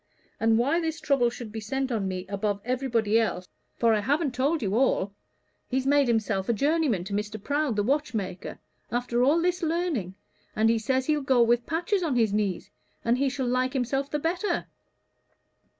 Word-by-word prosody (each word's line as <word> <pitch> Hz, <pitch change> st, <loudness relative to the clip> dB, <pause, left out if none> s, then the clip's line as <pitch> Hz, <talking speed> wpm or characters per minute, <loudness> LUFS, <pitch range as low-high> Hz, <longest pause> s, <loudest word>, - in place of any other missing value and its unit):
And 225 Hz, 0 st, +3 dB
why 280 Hz, +8 st, +2 dB
this 325 Hz, -1 st, -2 dB
trouble 275 Hz, -6 st, +2 dB
should 235 Hz, -2 st, -8 dB
be 220 Hz, -, -5 dB
sent 265 Hz, +4 st, -2 dB
on 210 Hz, -5 st, -1 dB
me 185 Hz, -1 st, -4 dB
above 200 Hz, +1 st, -2 dB
everybody 235 Hz, -4 st, +1 dB
else 180 Hz, -5 st, -1 dB, 0.3 s
for 230 Hz, -1 st, +3 dB
I 215 Hz, -, +2 dB
haven't 285 Hz, +5 st, 0 dB
told 275 Hz, +4 st, 0 dB
you 195 Hz, -1 st, -1 dB
all. 215 Hz, -6 st, +1 dB, 0.6 s
He's 260 Hz, 0 st, 0 dB
made 285 Hz, -1 st, +4 dB
himself 215 Hz, -4 st, 0 dB
a -, -, +4 dB
journeyman 280 Hz, -, +1 dB
to 195 Hz, +2 st, -6 dB
Mr. 210 Hz, +1 st, -3 dB
Prowd 285 Hz, +2 st, -1 dB
the 205 Hz, -, +1 dB
watchmaker 220 Hz, -, -2 dB, 0.3 s
after 240 Hz, 0 st, 0 dB
all 290 Hz, +6 st, +4 dB
this 355 Hz, +1 st, 0 dB
learning 320 Hz, -, -1 dB, 0.4 s
and 220 Hz, +1 st, +3 dB
he 230 Hz, -, +1 dB
says 260 Hz, +3 st, 0 dB
he'll 300 Hz, 0 st, +1 dB
go 260 Hz, -3 st, +4 dB
with 235 Hz, +1 st, +2 dB
patches 350 Hz, +5 st, 0 dB
on 315 Hz, -7 st, 0 dB
his 225 Hz, -4 st, +2 dB
knees, 205 Hz, -4 st, -1 dB, 0.3 s
and 235 Hz, +2 st, +2 dB
he 275 Hz, 0 st, +2 dB
shall 265 Hz, 0 st, -3 dB
like 255 Hz, +1 st, 0 dB
himself 270 Hz, +2 st, -1 dB
the 300 Hz, -, -1 dB
better. 345 Hz, +7 st, -1 dB
245 Hz, 185 wpm, -27 LUFS, 215-285 Hz, 0.6 s, made